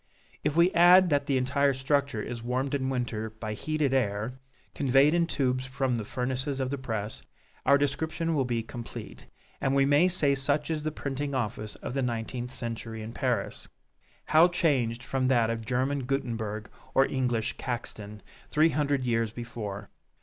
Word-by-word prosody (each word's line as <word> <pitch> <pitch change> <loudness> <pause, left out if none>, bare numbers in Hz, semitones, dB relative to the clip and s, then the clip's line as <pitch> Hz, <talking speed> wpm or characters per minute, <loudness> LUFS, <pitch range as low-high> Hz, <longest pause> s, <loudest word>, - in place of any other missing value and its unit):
If 150 0 0
we 170 +2 +5
add 180 0 +7
that 145 0 +2
the 135 - +2
entire 140 +2 +2
structure 140 -3 0
is 120 -1 -5
warmed 130 +3 -1
in 130 -2 0
winter 120 -4 -2
by 110 0 -6
heated 150 +3 -1
air, 115 0 -1 0.3
conveyed 140 +2 +4
in 170 -1 +2
tubes 130 -4 0
from 130 -1 -1
the 110 - -3
furnaces 130 +4 -2
of 130 0 -1
the 140 - -1
press, 110 -4 -4 0.5
our 140 - +7
description 160 +4 -1
will 140 -4 +2
be 120 -2 -1
complete, 115 +1 -9 0.3
and 135 0 +1
we 135 0 +4
may 145 +5 +5
say 160 -6 +2
such 140 +3 0
is 155 -1 -1
the 155 +1 -2
printing 140 -1 -3
office 110 -3 -2
of - - -6
the 135 - 0
nineteenth 120 0 -3
century 115 -2 -5
in 110 +2 -7
Paris. 125 -7 -2 0.6
How 160 +3 +6
changed 130 -10 +1
from 130 +1 0
that 120 -3 +3
of 115 -1 -5
German 130 +2 0
Guttenberg 110 -6 -3 0.2
or 135 - +6
English 125 -4 -1
Caxton, 105 -4 -5 0.3
three 155 +2 +4
hundred 145 -2 0
years 115 -2 +1
before! 110 -4 -6
130 Hz, 170 wpm, -28 LUFS, 115-140 Hz, 0.6 s, add